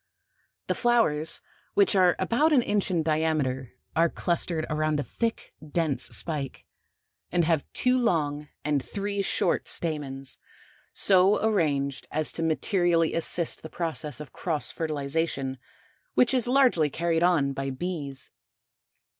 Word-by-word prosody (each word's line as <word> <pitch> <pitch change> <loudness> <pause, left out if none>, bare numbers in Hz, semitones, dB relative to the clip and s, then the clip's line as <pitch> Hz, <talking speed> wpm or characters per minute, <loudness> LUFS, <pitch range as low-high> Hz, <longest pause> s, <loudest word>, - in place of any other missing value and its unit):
The - - 0
flowers, 225 -11 +2 0.3
which 400 - +4
are 180 -2 +5
about 235 +12 +2
an 265 -5 +4
inch 205 -2 0
in 170 -3 +1
diameter, 150 -5 0 0.2
are 165 +1 +4
clustered 170 -1 -1
around 155 0 0
a - - -1
thick, 230 - -3
dense 155 -2 -1
spike, 145 -5 -3 0.7
and 175 -1 +2
have 160 -3 +2
two 255 0 +2
long 150 -9 0 0.2
and 145 -3 +1
three 200 0 -3
short 195 - 0
stamens, 140 -5 -3 0.5
so 190 +1 +5
arranged 145 -10 0
as 155 0 0
to - - -4
materially 165 +1 +1
assist 165 0 +1
the 160 - -8
process 160 -3 -2
of 150 - -9
cross 160 -4 -1
fertilization 145 -3 -2 0.6
which 250 +1 +4
is 250 -2 +3
largely 250 - +4
carried 165 +2 0
on 165 -6 +3
by 135 0 -3
bees. 140 -2 -3
160 Hz, 130 wpm, -27 LUFS, 145-185 Hz, 0.7 s, are